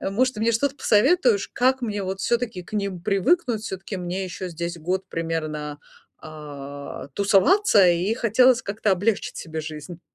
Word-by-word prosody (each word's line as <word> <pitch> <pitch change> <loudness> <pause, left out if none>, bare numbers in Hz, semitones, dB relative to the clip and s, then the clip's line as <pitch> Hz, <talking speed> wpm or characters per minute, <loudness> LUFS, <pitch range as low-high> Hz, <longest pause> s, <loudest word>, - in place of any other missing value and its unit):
может, 250 +6 0
ты 215 - -6
мне 230 +1 +2
что-то 275 +4 0
посоветуешь, 240 - +3
как 260 +1 +2
мне 210 -4 -2
вот 190 +1 -4
всё-таки 235 -6 -1
к - - -18
ним 200 -3 -2
привыкнуть? 225 - +1
Всё-таки 190 0 -6
мне 180 +2 -3
ещё 185 +1 -6
здесь 170 0 -5
год 185 +4 -2
примерно, 155 -3 -4 0.5
а, 145 -3 -8
тусоваться 200 - +4
и 175 +6 +1
хотелось 250 +2 +4
как-то 205 0 0
облегчить 205 +3 -1
себе 160 -1 -5
жизнь. 155 +2 -8
195 Hz, 155 wpm, -24 LUFS, 170-230 Hz, 0.5 s, тусоваться